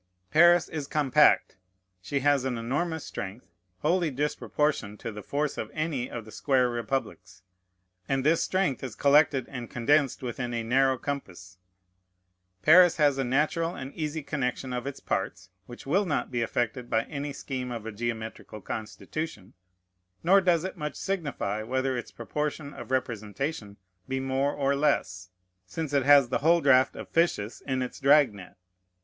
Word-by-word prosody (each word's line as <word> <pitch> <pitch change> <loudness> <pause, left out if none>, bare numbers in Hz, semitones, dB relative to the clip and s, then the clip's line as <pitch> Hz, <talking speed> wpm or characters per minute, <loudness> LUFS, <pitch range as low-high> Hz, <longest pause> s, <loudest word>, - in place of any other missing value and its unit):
Paris 175 +2 +6
is 150 -3 -5
compact; 150 -4 +3 0.4
she 140 +8 -2
has 145 -1 +3
an 130 -2 -2
enormous 145 +8 -2
strength, 100 +5 -7 0.4
wholly 170 +2 +2
disproportioned 145 -5 -1
to 115 - -5
the 105 0 -8
force 145 +5 -2
of - - -4
any 155 -6 -2
of 115 -2 -6
the 110 - -12
square 130 +2 +2
republics; 110 -6 -4 0.7
and 135 -1 +1
this 165 +2 +3
strength 185 -10 0
is 125 -5 -5
collected 140 -1 +4
and 125 -4 -7
condensed 135 +2 +1
within 120 0 -3
a 115 - -2
narrow 130 +3 +3
compass. 95 -10 -6 1.0
Paris 175 +2 +7
has 145 -3 +3
a - - +2
natural 155 +6 0
and 135 +1 -7
easy 155 -1 -3
connection 130 -2 -3
of 125 +2 -3
its 140 - -6
parts, 95 -1 -3 0.2
which 120 - -11
will 185 +8 +1
not 145 - -1
be 120 -2 -1
affected 120 +1 -2
by 110 -1 +2
any 145 +1 -5
scheme 130 -2 -5
of 115 -3 -6
a 115 - -4
geometrical 110 -1 -5
constitution; 110 - -6 0.7
nor 195 +4 +5
does 175 -3 +2
it 190 - -4
much 150 -2 -4
signify 145 - -3
whether 130 +3 -1
its 120 - -5
proportion 150 +4 -4
of - - -9
representation 115 -2 -3 0.3
be 130 0 -2
more 135 +1 0
or 140 -1 0
less, 95 -11 0 0.4
since 145 - -4
it 140 - +4
has 140 -4 +7
the - - 0
whole 165 +4 +4
draught 130 -4 +4
of - - -7
fishes 145 -11 0
in 130 -1 0
its 125 - -7
drag 140 -3 +5
net. 95 -3 -12
135 Hz, 160 wpm, -27 LUFS, 120-150 Hz, 1.0 s, Paris